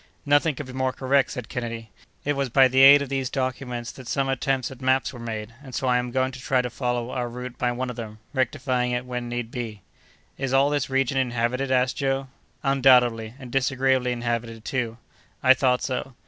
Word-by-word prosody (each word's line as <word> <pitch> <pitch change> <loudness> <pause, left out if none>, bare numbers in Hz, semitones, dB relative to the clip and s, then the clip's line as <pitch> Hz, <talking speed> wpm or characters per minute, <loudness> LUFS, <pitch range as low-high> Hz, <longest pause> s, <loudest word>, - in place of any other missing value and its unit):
"Nothing 145 +1 +3
could 145 - -6
be 130 - -10
more 130 0 0
correct," 135 +1 +1
said 125 -3 -6
Kennedy. 115 -2 -5 0.3
"It 145 - +2
was 140 -1 -1
by 130 +2 +6
the 130 +1 +1
aid 140 +1 +9
of 140 - -7
these 135 -2 -1
documents 125 -2 -3
that 130 -3 -12
some 135 +1 0
attempts 135 0 0
at 130 0 -11
maps 130 0 +1
were 120 - -9
made, 110 -1 -5
and 130 -3 -9
so - - -2
I 125 -1 +3
am 125 0 -3
going 130 +1 0
to 130 - -9
try 130 0 +1
to 125 - -4
follow 120 -1 -2
our 120 -1 -2
route 125 +1 -8
by 125 -1 +1
one 125 +1 -3
of - - -9
them, 110 -2 -7 0.2
rectifying 130 -2 0
it 120 +1 -2
when 125 -1 -4
need 120 -1 -4
be." 110 -6 -6 0.6
"Is 135 -1 -2
all 135 +2 +4
this 145 -2 0
region 135 0 +1
inhabited?" 125 +1 0
asked 130 0 +2
Joe. 135 -1 -1 0.3
"Undoubtedly; 125 -4 +4
and 130 -3 -10
disagreeably 130 -1 +1
inhabited, 115 -2 -3
too." 120 -5 -2 0.5
"I 130 - +8
thought 125 -1 +1
so." 130 0 -3
130 Hz, 210 wpm, -25 LUFS, 120-135 Hz, 0.6 s, aid